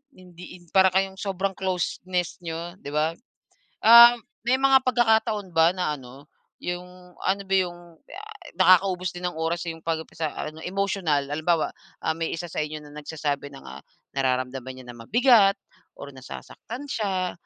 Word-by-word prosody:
hindi 180 0 -13
in - - -20
para 190 -1 +6
kayong 190 +1 0
sobrang 195 -1 -2
closeness 180 -1 -2
niyo, 170 +1 -5
'di 145 - -8
ba? 155 +1 +2 0.7
Um, 235 +1 +9 0.3
may 260 +2 +3
mga 270 -1 +5
pagkakataon 220 -6 +1
ba 165 +1 +5
na 180 -5 -1
ano, 130 +3 -14 0.4
'yong 180 0 -7
ano 200 +1 0
ba 195 - 0
'yong, 175 -2 +1 0.3
yay, 390 +5 -10 0.4
nakakaubos 185 -1 +4
din 180 0 -4
ng 175 - -9
oras 165 +1 -1
'yong 165 0 -6
'pag 160 -1 -1 0.2
sa 160 -2 -2
ano 155 +1 -6
emotional. 180 -7 -1
Halimbawa, 155 +2 +1 0.4
ah, - - +1
may 165 0 -2
isa 175 +1 -5
sa 155 - -2
inyo 155 0 -6
na 145 0 -14
nagsasabi 145 -2 -4
ng, 135 - -12
ah, - - -10 0.3
nararamdaman 130 -1 -2
niya 130 - -11
na - - -7
mabigat 225 -4 +5 0.4
or 140 - -9
nasasaktan 140 - -9
siya 195 -8 -2
180 Hz, 160 wpm, -25 LUFS, 155-195 Hz, 0.7 s, Um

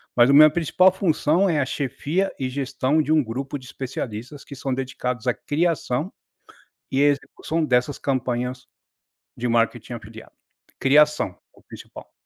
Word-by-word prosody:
Mas 120 +2 +5
a - - +5
minha 155 +2 +9
principal 175 +4 +3
função 180 0 +1
é 155 -4 +1
a 130 - +1
chefia 150 +7 -2
e 130 -1 -2
gestão 135 +2 0
de 155 +1 -2
um 155 -2 +4
grupo 130 +5 -5
de 130 - -14
especialistas 125 +1 -6
que 140 - -10
são 135 0 -4
dedicados 125 -2 -4
à 125 - +2
criação 155 0 -1 0.8
e 135 - 0
execução 145 +3 0
dessas 130 0 +1
campanhas 125 -1 -2 0.7
de 125 - -2
marketing 115 +1 0
afiliado. 110 0 -11 0.5
Criação, 145 -7 +3 0.2
o - - -22
principal. - - -13
135 Hz, 145 wpm, -23 LUFS, 125-150 Hz, 0.8 s, minha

